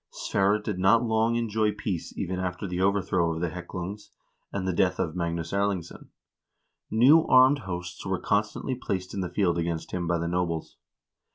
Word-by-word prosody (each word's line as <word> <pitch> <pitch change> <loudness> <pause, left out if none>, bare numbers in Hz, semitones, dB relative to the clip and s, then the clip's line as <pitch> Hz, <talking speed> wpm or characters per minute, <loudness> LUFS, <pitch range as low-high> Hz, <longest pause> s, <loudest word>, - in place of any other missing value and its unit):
Sverre 100 +2 +1
did 105 -3 -4
not 100 +6 +4
long 110 0 +1
enjoy 110 -2 0
peace 90 -6 -4
even 90 +1 -2
after 90 +1 -3
the 90 0 -3
overthrow 95 -3 +1
of - - -4
the 85 -1 -1
Heklungs, 90 +3 -7 0.4
and 95 -2 -3
the 95 - 0
death - - +2
of 80 - -2
Magnus 85 -1 -3
Erlingsson. 100 -4 -2 0.8
New 135 +9 +6
armed 130 +3 +6
hosts 90 0 -5
were 95 -1 -1
constantly 105 +5 -1
placed 95 -7 -4
in 100 - -2
the 90 - -3
field 85 -2 +1
against 85 -1 -3
him 90 -2 -2
by 85 +1 +1
the 85 0 -2
nobles. 85 -2 -2
95 Hz, 175 wpm, -27 LUFS, 85-105 Hz, 0.8 s, New